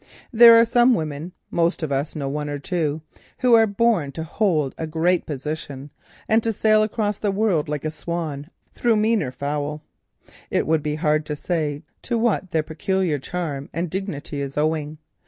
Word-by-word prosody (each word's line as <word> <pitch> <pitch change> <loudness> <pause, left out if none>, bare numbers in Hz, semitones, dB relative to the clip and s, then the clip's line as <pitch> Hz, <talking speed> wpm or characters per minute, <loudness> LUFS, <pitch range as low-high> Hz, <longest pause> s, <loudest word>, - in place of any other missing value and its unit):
There 230 0 +9
are 230 - +6
some 240 +1 +4
women—most 165 +2 -2
of 155 - -2
us 140 +2 -2
know 145 -3 -3
one 150 +1 -3
or 145 - -3
two—who 160 - -2
are 225 -1 +6
born 200 -8 +1
to 160 - -4
hold 160 -5 0
a 160 - -4
great 170 +3 +1
position 145 -1 -5 0.4
and 220 +1 +3
to 225 - 0
sail 215 0 +3
across 215 -1 -1
the 210 - 0
world 195 -7 +1
like 150 0 -3
a 155 - -1
swan 160 -3 -5 0.2
through 235 -2 +2
meaner 215 - +1
fowl. 145 +3 -3 0.7
It - - 0
would 160 0 +2
be 150 0 -2
very 155 - -8
hard 155 -2 +1
to 150 - -2
say 150 -2 -2 0.2
to 240 - -2
what 225 -5 0
their 160 -3 0
peculiar 175 0 -1
charm 145 -2 -4
and 170 0 -3
dignity 160 -6 -4
is 140 0 -5
owing. 155 0 -1
160 Hz, 175 wpm, -23 LUFS, 150-200 Hz, 0.7 s, There